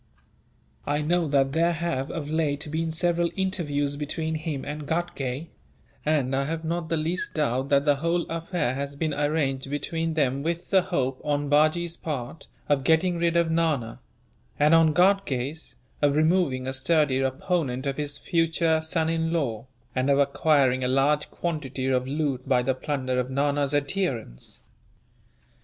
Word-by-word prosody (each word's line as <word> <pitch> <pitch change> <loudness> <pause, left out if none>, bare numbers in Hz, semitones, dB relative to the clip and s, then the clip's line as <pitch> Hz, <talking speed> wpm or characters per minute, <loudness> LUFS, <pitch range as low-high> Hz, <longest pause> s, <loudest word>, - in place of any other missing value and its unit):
I 145 +1 0
know 170 +1 +1
that 135 -2 +2
there 170 +3 +2
have, 160 -5 -2
of 155 -3 -4
late, 150 -1 -1
been 160 +1 -1
several 170 +1 +1
interviews 145 -7 -1
between 155 +2 -3
him 155 -3 -3
and 150 0 -5
Ghatgay; 160 -3 -2 0.5
and 140 -4 +1
I 135 +1 0
have 160 +2 -3
not 165 0 -2
the 165 - +1
least 165 +3 -2
doubt 135 -3 0
that 140 0 +3
the 145 -2 +3
whole 170 +3 0
affair 165 -5 -2
has 140 +1 -4
been 155 +1 -1
arranged 145 -2 0
between 160 +3 -2
them 140 -3 +1
with 170 +3 -3
the 190 -2 +6
hope, 130 -5 -2
on 145 -1 -1
Bajee's 155 +3 +2
part, 145 -1 -5 0.2
of 140 -2 +2
getting 170 +3 +2
rid 170 0 +2
of 170 -1 +2
Nana; 155 -9 0 0.6
and 150 +2 +4
on 165 -1 +6
Ghatgay's, 160 -6 +1 0.3
of 145 -1 +3
removing 155 -5 +2
a 130 - -3
sturdy 140 0 +2
opponent 135 0 -1
of 135 -1 -2
his 145 -1 -2
future 165 -1 +1
son 160 0 0
in 165 0 0
law, 130 -8 -2 0.3
and 130 +2 +1
of 140 - +4
acquiring 140 -2 +3
a - - +1
large 140 +3 +2
quantity 145 -6 -3
of 130 -1 +1
loot 140 -2 -2
by 125 -2 +3
the 130 +1 +1
plunder 130 -1 -2
of 125 0 -2
Nana's 140 +1 0
adherents. 140 - -2
150 Hz, 160 wpm, -26 LUFS, 135-165 Hz, 0.6 s, the